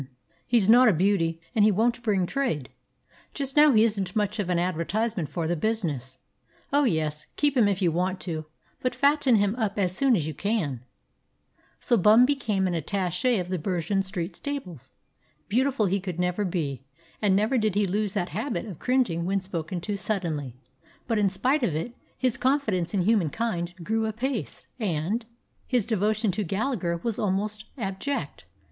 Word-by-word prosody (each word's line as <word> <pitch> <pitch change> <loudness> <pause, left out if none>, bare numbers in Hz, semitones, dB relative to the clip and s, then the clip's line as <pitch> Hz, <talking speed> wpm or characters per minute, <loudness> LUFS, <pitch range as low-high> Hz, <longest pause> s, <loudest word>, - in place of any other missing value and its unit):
He's 230 -5 +3
not 245 +3 +7
a 215 - +5
beauty, 165 -2 +1
and 220 -4 +3
he 215 - +6
won't 235 +4 +1
bring 200 -6 +1
trade. 175 - -2 0.7
Just 275 -2 -3
now 300 0 +7
he 220 -3 +5
isn't 200 -5 0
much 210 0 0
of 195 -3 -1
an 180 - +2
advertisement 180 +2 -1
for 165 -2 -2
the 175 - 0
business. 150 - -2 0.6
Oh, 285 0 +4
yes, 155 - -1
keep 290 -1 +1
him 235 -5 +5
if 195 -1 0
you 170 - +3
want 185 +3 -1
to, 160 -3 -4 0.4
but 255 - -1
fatten 280 -3 +3
him 205 -1 +2
up 215 -4 -1
as 185 -2 0
soon 265 +2 +3
as 165 -7 0
you 155 - -4
can." 165 - -1 1.0
So 240 - +2
Bum 215 +5 +6
became 235 -9 0
an 180 - 0
attache 185 - 0
of 180 -2 -3
the 185 -1 -1
Bergen 185 +3 0
Street 185 -3 -4
Stables. 180 - -6 0.6
Beautiful 255 +1 +1
he 195 +1 +1
could 180 -2 -5
never 180 +3 0
be, 155 -8 -2 0.4
and 200 -3 +3
never 220 +6 +2
did 215 -3 0
he 205 0 +3
lose 205 +2 -1
that 180 -3 -1
habit 225 - -3
of 195 -7 -8
cringing 250 -10 +1
when 195 +1 +1
spoken 180 -2 -4
to 205 +3 -3
suddenly, 160 - -3 0.5
but 225 -3 +1
in 200 -2 +3
spite 255 +11 +1
of 195 -11 0
it, 165 +10 -3 0.2
his 255 -3 0
confidence 230 - 0
in 185 - +2
humankind 180 -2 0
grew 220 +4 0
apace, 240 +3 -3
and 205 +3 -1 0.4
his 245 -6 +1
devotion 215 -1 +1
to 210 +4 -2
Gallagher 195 -2 -1
was 230 -3 -2
almost 210 +2 -1
abject. 215 +6 -4
200 Hz, 175 wpm, -26 LUFS, 175-230 Hz, 1.0 s, not